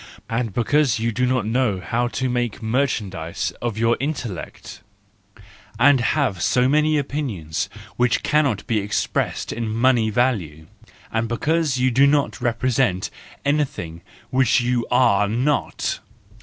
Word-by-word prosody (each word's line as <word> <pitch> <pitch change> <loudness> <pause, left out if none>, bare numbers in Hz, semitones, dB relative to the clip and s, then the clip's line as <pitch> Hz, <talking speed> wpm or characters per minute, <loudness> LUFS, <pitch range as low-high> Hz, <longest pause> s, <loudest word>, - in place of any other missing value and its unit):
And 115 -1 -2
because 125 +3 +2
you 115 +1 -1
do 125 +3 0
not 125 -4 +1
know 115 -3 +1
how 120 +5 -1
to 130 +2 -2
make 120 -2 -2
merchandise 110 -9 -1
of 120 -3 -2
your 115 +1 +2
intellect! 130 - -5 1.0
And 135 +3 +5
have 120 - 0
so 125 +7 +3
many 150 +2 +3
opinions 100 - -3 0.3
which 125 -1 +2
cannot 145 -9 +1
be 115 - 0
ex¬ 105 0 -1
pressed - - -1
in 115 -1 -3
money 115 0 +2
value! 100 - -1 0.5
And 115 0 0
because 150 +4 0
you 130 0 +2
do 135 +4 +5
not 145 0 +1
represent 120 -5 0 0.3
anything 135 - -1 0.3
which 130 -2 +3
you 120 -1 0
are 115 -5 +3
not! 125 +7 -1
120 Hz, 135 wpm, -22 LUFS, 110-135 Hz, 1.0 s, And